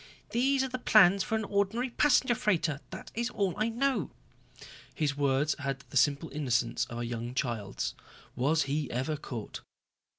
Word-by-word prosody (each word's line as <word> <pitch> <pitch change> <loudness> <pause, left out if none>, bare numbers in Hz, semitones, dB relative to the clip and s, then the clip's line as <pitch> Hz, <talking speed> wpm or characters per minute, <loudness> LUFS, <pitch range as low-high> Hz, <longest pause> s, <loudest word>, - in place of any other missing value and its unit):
"These 265 +3 +2
are - - -1
the 255 0 -5
plans 200 -5 +6
for 220 - -1
an 220 - -1
ordinary 205 +5 0
passenger 260 -2 +3
freighter, 170 - 0
that - - -9
is 235 +1 -1
all 195 -6 -1
I 215 +2 0
know." 265 +3 0 0.9
His 150 -3 0
words 140 +1 +1
had 135 0 -3
the - - -10
simple 140 +4 +2
innocence 125 -5 0
of 120 - -6
a 120 - -3
young 120 +1 -5
child's. 115 -7 -2 0.4
Was 150 +5 +2
he 145 0 -2
ever 130 +6 -1
caught. 120 -7 -7
155 Hz, 165 wpm, -30 LUFS, 130-220 Hz, 0.9 s, plans